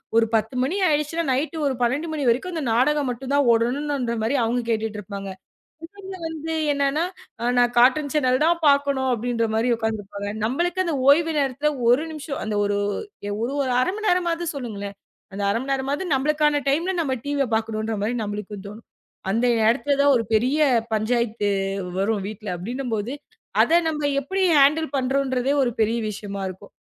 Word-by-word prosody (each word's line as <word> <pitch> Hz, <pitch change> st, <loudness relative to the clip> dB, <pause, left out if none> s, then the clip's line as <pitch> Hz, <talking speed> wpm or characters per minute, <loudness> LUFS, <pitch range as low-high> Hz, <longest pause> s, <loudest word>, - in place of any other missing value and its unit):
ஒரு 230 Hz, 0 st, +5 dB
10 225 Hz, +3 st, +1 dB
மணி 285 Hz, +8 st, -1 dB
ஆயிடுச்சுனா 300 Hz, +2 st, 0 dB
நைட் 300 Hz, +6 st, -1 dB
ஒரு 275 Hz, -, +1 dB
12 265 Hz, +7 st, 0 dB
மணி 300 Hz, -3 st, -2 dB
வரைக்கும் 260 Hz, +11 st, +1 dB
அந்த 320 Hz, -3 st, -3 dB
நாடகம் 285 Hz, +4 st, +2 dB
மட்டும் 255 Hz, +2 st, -5 dB
தான் 285 Hz, -2 st, +3 dB
ஓடனும்னு 240 Hz, 0 st, 0 dB
அவங்க 235 Hz, +2 st, 0 dB
கேட்டுட்டு 220 Hz, -2 st, -1 dB
இருப்பாங்க. 200 Hz, -1 st, -7 dB, 0.8 s
இவுங்க 380 Hz, -1 st, -7 dB
வந்து 320 Hz, 0 st, -4 dB, 0.2 s
என்னன்னா, 280 Hz, +3 st, +1 dB, 0.5 s
நான் 245 Hz, 0 st, +3 dB
கார்டூன் 275 Hz, +3 st, +4 dB
சேனல் 260 Hz, -1 st, +2 dB
தான் 340 Hz, +1 st, +2 dB
பாக்கணும் 280 Hz, -2 st, +2 dB
அப்படின்ற 235 Hz, 0 st, -1 dB
மாதிரி 225 Hz, +3 st, +1 dB
உக்காந்து 220 Hz, -1 st, -2 dB
இருப்பாங்க. 205 Hz, +1 st, -6 dB
நம்மளுக்கு 345 Hz, +10 st, 0 dB
அந்த 335 Hz, -3 st, -1 dB, 0.2 s
ஓய்வு 325 Hz, +2 st, +4 dB
நேரத்துல 280 Hz, +2 st, +1 dB, 0.2 s
1 255 Hz, +7 st, +4 dB
நிமிஷம் 300 Hz, -2 st, -5 dB
அந்த 215 Hz, -1 st, -2 dB
ஒரு 205 Hz, 0 st, 0 dB, 0.8 s
ஒரு 260 Hz, -, -2 dB
1/2 365 Hz, -, +1 dB
மணி 435 Hz, 0 st, -2 dB
நேரமாவது 345 Hz, -1 st, +1 dB
சொல்லுங்களேன். 205 Hz, -6 st, -6 dB, 0.4 s
அந்த 200 Hz, +1 st, -4 dB
அரை 230 Hz, +4 st, 0 dB
மணி 275 Hz, -, -2 dB
நேரமாவது 280 Hz, +7 st, -2 dB
நம்மளுக்கான 295 Hz, +1 st, +2 dB
டைம் 330 Hz, +7 st, +1 dB
நம்ம 265 Hz, -4 st, -1 dB
டிவி 280 Hz, -3 st, 0 dB
பாக்கணும்னு 220 Hz, +1 st, -2 dB
நம்மளுக்கு 205 Hz, -1 st, -6 dB
தோணும். 215 Hz, +3 st, -12 dB, 0.4 s
அந்த 230 Hz, +5 st, +1 dB, 0.2 s
இடத்துல 280 Hz, +4 st, +2 dB
தான் 285 Hz, 0 st, +5 dB
ஒரு 230 Hz, -, +1 dB
பெரிய 250 Hz, +7 st, +2 dB, 0.3 s
பஞ்சாயத்து 220 Hz, -1 st, 0 dB, 0.5 s
வரும் 200 Hz, 0 st, 0 dB
வீட்டுல 215 Hz, -1 st, -8 dB
அப்படின்னும் 245 Hz, +7 st, -5 dB
போது, 220 Hz, +4 st, -3 dB, 0.5 s
அத 335 Hz, -, +4 dB
நம்ம 300 Hz, -2 st, -1 dB
எப்படி 380 Hz, +8 st, -2 dB, 0.2 s
ஹண்டில் 310 Hz, +3 st, +3 dB
பண்றோம்றதே 265 Hz, 0 st, 0 dB
ஒரு 240 Hz, -, 0 dB
பெரிய 225 Hz, +2 st, +2 dB
விஷயமா 200 Hz, -1 st, -6 dB
இருக்கும். 185 Hz, 0 st, -11 dB
260 Hz, 160 wpm, -23 LUFS, 225-295 Hz, 0.8 s, ஒரு